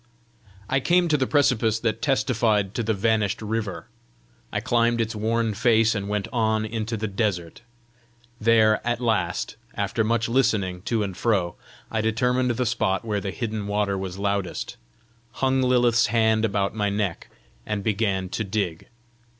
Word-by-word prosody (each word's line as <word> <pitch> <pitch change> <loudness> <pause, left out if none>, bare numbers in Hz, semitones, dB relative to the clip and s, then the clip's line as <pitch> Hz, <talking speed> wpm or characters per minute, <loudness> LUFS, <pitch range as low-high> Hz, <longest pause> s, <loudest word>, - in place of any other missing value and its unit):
I 135 - +1
came 175 +5 +3
to 155 - +3
the 130 -3 +1
precipice 120 -6 +2
that 115 -1 -1
testified 115 -7 +1
to - - -1
the 110 -1 0
vanished 110 0 +1
river. 110 -2 -3 0.7
I - - -1
climbed 120 0 +1
its 115 0 -1
worn 110 +1 0
face, 115 +1 +3
and 100 -2 -3
went 105 -1 -1
on 110 -2 +1
into 110 +1 -3
the 110 +1 -2
desert. 95 -4 -2 0.8
There 110 -1 +4
at 120 0 -1
last, 110 -4 -1 0.2
after 105 +3 0
much 110 0 +1
listening 105 -8 +1
to 115 -3 0
and 95 -3 -4
fro, 95 -5 +1 0.4
I 110 - 0
determined 125 +3 +1
the 120 +1 0
spot 105 -1 0
where 105 -2 -1
the 100 - -3
hidden 110 +1 -4
water 100 -1 0
was 95 -1 -5
loudest, 100 -2 -2 0.6
hung 130 0 +1
Lilith's 120 -2 +3
hand 110 0 +2
about 100 -2 0
my 105 -2 0
neck, 100 -4 -2 0.4
and 105 - -3
began 100 -3 0
to 110 - -2
dig. 95 -5 -3
110 Hz, 160 wpm, -24 LUFS, 100-115 Hz, 0.8 s, There